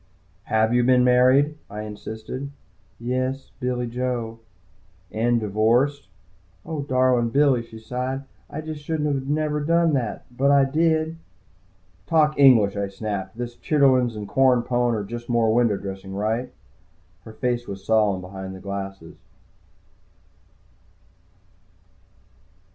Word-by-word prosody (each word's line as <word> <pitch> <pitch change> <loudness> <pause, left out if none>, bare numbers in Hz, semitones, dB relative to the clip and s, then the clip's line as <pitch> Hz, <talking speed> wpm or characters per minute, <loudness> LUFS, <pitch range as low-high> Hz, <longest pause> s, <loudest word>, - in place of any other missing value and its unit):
"Have 110 +1 +2
you 120 0 +3
been 125 0 +4
married?" 130 +4 +4
I 105 +1 -6
insisted. 110 +5 -7 0.5
"Yes, 130 +3 -2
Billy 125 -1 -1
Joe." 120 -2 -3 0.7
"And 120 +2 +1
divorced?" 115 +4 +1 0.6
"Oh, 155 -2 -4
darlin' 130 -3 +2
Billy," 135 -1 +3
she 115 -1 -12
sighed. 125 +4 -4 0.3
"I 155 - -5
jest 155 -1 -7
shouldn't 145 -3 -2
never 150 0 0
a 145 - -4
done 170 -1 +3
that. 120 -6 -2
But 140 +3 +2
I 140 -1 +5
did," 135 - -8 0.2
she 160 - +3
added. 160 +1 -3 0.9
"Talk 150 -2 +2
English," 115 -8 +6
I 100 -1 -1
snapped. 100 0 -5
"This 120 0 -5
chitterlin's 130 -6 +3
and 105 -1 -6
corn 130 -1 +3
pone 120 -1 +1
are 105 - -2
just 120 +4 -7
more 115 -2 +2
window 115 -4 +3
dressing, 95 0 -7
right?" 110 +5 -1 0.7
Her 110 - -11
face 120 +1 -2
was 95 -1 -8
solemn 105 -4 +2
behind 95 +1 -8
the - - -10
glasses. 95 -4 -7
120 Hz, 130 wpm, -23 LUFS, 110-135 Hz, 0.9 s, English